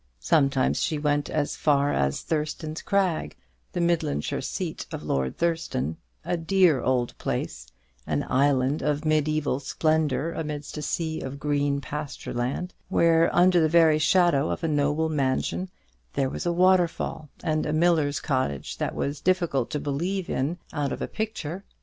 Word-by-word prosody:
Sometimes 135 - +2
she 160 -4 0
went 145 -1 0
as 150 -2 -1
far 145 -1 +2
as 70 0 0
Thurston's 155 0 -3
Crag, 190 -5 0 0.4
the - - -2
Midlandshire 170 - 0
seat - - -4
of - - -5
Lord 65 -1 -1
Thurston; 165 - -1 0.3
a - - 0
dear 165 -4 +3
old 125 -1 0
place, - - -3 0.4
an 75 -2 -1
island 135 +1 +2
of 150 +1 0
mediæval 155 -3 +1
splendour 155 +2 0
amidst 150 -3 -5
a 150 - -4
sea 160 +1 -2
of 135 +1 -6
green 145 -1 0
pasture 145 +2 -6
land, 130 +9 -2 0.2
where, 165 -2 +4
under 180 0 +5
the 160 -1 +3
very 160 -2 +5
shadow 160 -2 +3
of - - -3
a - - +2
noble 150 +1 +1
mansion, 150 +5 -1 0.4
there 135 -1 0
was - - -4
a - - +2
waterfall 175 -3 +2
and 155 -1 0
a - - -1
miller's 155 -3 +2
cottage 130 - -2
that - - -2
was 140 +1 -2
difficult 170 -9 +1
to 150 - -2
believe 170 +7 -2
in 150 +7 -1 0.2
out 145 -2 -1
of - - -3
a - - -2
picture. 195 -5 -4
150 Hz, 155 wpm, -26 LUFS, 140-170 Hz, 0.4 s, under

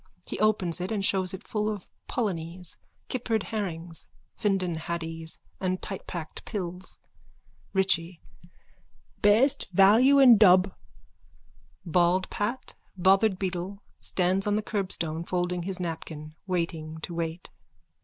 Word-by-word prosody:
He - - -5
opens 190 -5 +2
it 185 - -3
and 200 -3 0
shows 190 -2 +2
it 190 +2 -8
full 210 0 0
of 205 -4 -5 0.2
polonies, 180 -6 -3 0.3
kippered 230 -4 -1
herrings, 175 -6 -4 0.3
Findon 195 -5 0
haddies 165 0 -4 0.2
and 185 -1 -1
tightpacked 175 -4 -6
pills.)_ 180 -3 -4 0.8
RICHIE: 185 -3 +1 1.0
Best 220 +7 +4
value 220 +9 +6
in 250 -6 +8
Dub. 185 -2 +6 1.1
_(Bald 175 +2 +2
Pat, 225 +5 -3 0.2
bothered 195 +2 +4
beetle, 190 +1 -4 0.2
stands 185 +2 +1
on 205 - +2
the 215 - 0
curbstone, 170 -6 -1
folding 180 0 -1
his 185 +1 -3
napkin, 160 -3 -5
waiting 165 -3 -2
to 170 - -6
wait.) 165 +1 -4
185 Hz, 115 wpm, -27 LUFS, 170-205 Hz, 1.1 s, in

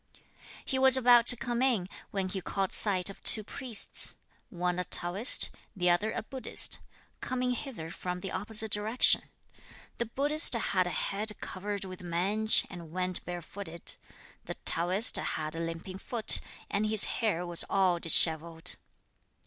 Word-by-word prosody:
He 265 - -3
was 265 0 +8
about 240 -2 +4
to 245 - +7
come 240 0 -4
in, 235 -9 0 0.2
when 195 -2 -3
he 190 0 -5
caught 195 +1 -4
sight 190 -4 +1
of - - -17
two 215 - +8
priests, 235 0 -1 0.3
one 180 0 -3
a - - -1
Taoist, 180 +7 +2 0.2
the 180 -2 +1
other 205 +6 -1
a 220 - -5
Buddhist, 260 +3 -3 0.4
coming 255 0 -3
hither 230 - -7
from 180 0 -7
the 190 - -7
opposite 215 +2 -2
direction. 215 +4 +2 0.7
The 235 - -2
Buddhist 290 +6 +3
had 185 -5 -1
a - - -3
head 210 +5 -2
covered 200 +1 -6
with 185 -1 -10
mange, 190 +6 -1
and 170 -3 -12
went 185 +1 -2
barefooted. 175 0 -8 0.5
The - - -6
Taoist 185 +7 +2
had 155 0 -5
a - - -6
limping 165 +3 -7
foot, 230 0 +3 0.3
and 210 +2 -2
his 215 -1 +4
hair 190 -7 -3
was 175 -1 +4
all 185 -3 +1
dishevelled. 165 0 +3
195 Hz, 150 wpm, -28 LUFS, 175-225 Hz, 0.7 s, was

